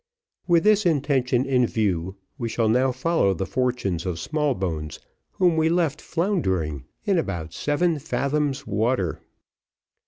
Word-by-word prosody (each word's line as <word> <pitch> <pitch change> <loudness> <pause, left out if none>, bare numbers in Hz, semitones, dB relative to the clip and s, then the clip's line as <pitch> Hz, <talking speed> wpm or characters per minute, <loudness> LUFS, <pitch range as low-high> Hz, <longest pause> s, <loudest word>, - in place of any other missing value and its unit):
With 170 -2 +4
this 210 0 +4
intention 135 -5 +1
in 125 -3 +2
view, 95 -5 -1 0.2
we 115 -2 -2
shall 115 0 0
now 125 +4 +3
follow 130 - +1
the 95 - -2
fortunes 125 -8 -1
of 90 -3 -3
Smallbones, 95 - -2 0.4
whom 180 -3 +3
we 160 0 +3
left 165 -4 0
floundering 95 - -1 0.2
in 195 -5 +2
about 85 - -4
seven 155 - 0
fathoms 140 0 -1
water. 110 -3 0
130 Hz, 130 wpm, -24 LUFS, 95-155 Hz, 0.4 s, With